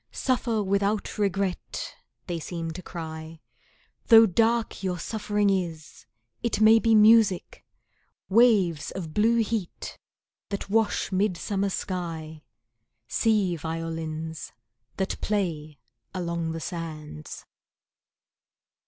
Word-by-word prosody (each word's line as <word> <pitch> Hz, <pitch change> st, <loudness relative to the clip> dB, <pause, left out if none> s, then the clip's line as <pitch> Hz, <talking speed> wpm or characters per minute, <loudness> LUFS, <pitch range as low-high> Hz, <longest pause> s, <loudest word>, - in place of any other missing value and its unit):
"Suffer 240 Hz, -4 st, 0 dB
without 200 Hz, +2 st, 0 dB
regret," 195 Hz, -2 st, -2 dB, 0.3 s
they 175 Hz, -2 st, -3 dB
seem 165 Hz, 0 st, -5 dB
to 175 Hz, +3 st, -7 dB
cry, 160 Hz, -2 st, -7 dB, 0.7 s
"Though 225 Hz, -1 st, +9 dB
dark 225 Hz, +3 st, +1 dB
your 185 Hz, -2 st, -2 dB
suffering 205 Hz, +2 st, 0 dB
is, 170 Hz, -5 st, -4 dB, 0.3 s
it 235 Hz, -3 st, -1 dB
may 220 Hz, +1 st, +7 dB
be 225 Hz, -1 st, +3 dB
music, 215 Hz, -3 st, +4 dB, 0.6 s
Waves 195 Hz, -8 st, +4 dB
of 165 Hz, -5 st, -6 dB
blue 230 Hz, +2 st, +3 dB
heat 215 Hz, -5 st, -4 dB, 0.5 s
that 200 Hz, -1 st, -5 dB
wash 220 Hz, -2 st, +1 dB
midsummer 195 Hz, +1 st, 0 dB
sky; 165 Hz, -5 st, -4 dB, 0.7 s
Sea 210 Hz, -, +2 dB
violins 160 Hz, 0 st, -5 dB, 0.4 s
that 190 Hz, 0 st, -2 dB
play 160 Hz, -8 st, -2 dB, 0.4 s
along 170 Hz, -2 st, -2 dB
the 165 Hz, -, -4 dB
sands." 155 Hz, -, -7 dB
190 Hz, 100 wpm, -26 LUFS, 165-215 Hz, 0.7 s, Though